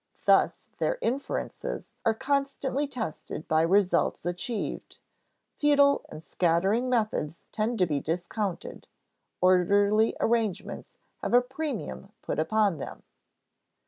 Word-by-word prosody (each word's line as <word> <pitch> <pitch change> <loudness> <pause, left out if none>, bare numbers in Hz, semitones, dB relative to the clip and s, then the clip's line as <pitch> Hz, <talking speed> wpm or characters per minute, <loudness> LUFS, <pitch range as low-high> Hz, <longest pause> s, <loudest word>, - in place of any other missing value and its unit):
Thus - - +3
their - - +1
inferences 275 - -3
are 225 - +3
constantly 275 +1 -1
tested 220 - -5
by 155 0 +3
results 180 0 +2
achieved; 205 +6 -4 0.6
futile 285 -1 +4
and 155 - -9
scattering 185 - +1
methods 215 -10 -1
tend 225 +2 -1
to 185 - +4
be 150 -4 -1
discounted; 175 +5 -4 0.5
orderly 200 +4 +4
arrangements 220 -4 -1 0.2
have - - 0
a 245 - +7
premium 250 - -5
put - - -2
upon 195 +1 +2
them. - - -7
215 Hz, 110 wpm, -28 LUFS, 175-250 Hz, 0.6 s, a